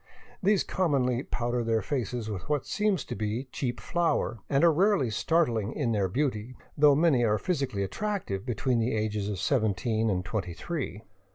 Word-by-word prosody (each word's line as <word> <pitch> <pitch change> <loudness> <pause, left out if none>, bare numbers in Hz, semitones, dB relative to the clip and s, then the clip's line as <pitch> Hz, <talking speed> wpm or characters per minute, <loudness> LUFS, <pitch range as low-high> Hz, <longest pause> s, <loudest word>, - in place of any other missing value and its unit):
These 200 0 +3
commonly 130 -9 +1
powder 120 -2 -2
their 115 -2 +1
faces 120 -2 -2
with 105 +1 -6
what 150 -2 0
seems 210 -7 0
to - - -5
be 110 +4 -2
cheap 120 -4 -3
flour, 165 -6 0
and 140 +1 +2
are 170 -2 +6
rarely 180 - +3
startling 120 -7 +1
in 130 -6 -1
their 100 -3 +1
beauty, 125 +1 -2 0.2
though 145 -1 +6
many 150 -5 +3
are 110 -2 +3
physically 135 - -1
attractive 175 - -3
between 125 +1 0
the 115 +1 0
ages 105 -1 -1
of 100 - -3
seventeen 110 -1 +1
and 90 -2 -1
twenty 90 -6 -3
three. 140 - -4
120 Hz, 170 wpm, -28 LUFS, 110-150 Hz, 0.2 s, are